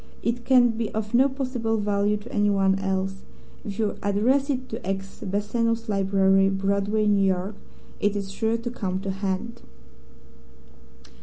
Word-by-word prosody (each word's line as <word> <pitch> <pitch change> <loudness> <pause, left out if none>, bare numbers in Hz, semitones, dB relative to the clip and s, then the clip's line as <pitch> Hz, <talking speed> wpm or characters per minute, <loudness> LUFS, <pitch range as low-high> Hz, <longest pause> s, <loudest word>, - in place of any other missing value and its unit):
It 235 +1 -1
can 250 -2 +5
be 225 -1 -3
of 215 0 -3
no 260 +3 +5
possible 255 -4 -2
value 205 0 +1
to 210 +4 -11
anyone 195 -2 +2
else. 195 0 -2 0.4
If 200 -1 -6
you 215 -2 -1
address 245 +8 +2
it 260 -2 -2
to 225 - -6
X, 195 +1 -4
Bassano's 230 +4 -1
Library, 195 -1 +3
Broadway, 200 +2 0
New 205 -1 +3
York, 190 +1 0 0.5
it 205 0 +1
is 200 -1 -4
sure 225 +3 0
to 235 +1 -5
come 190 -5 -3
to 195 -1 -2
hand." 195 +4 -3
205 Hz, 150 wpm, -25 LUFS, 195-230 Hz, 0.5 s, can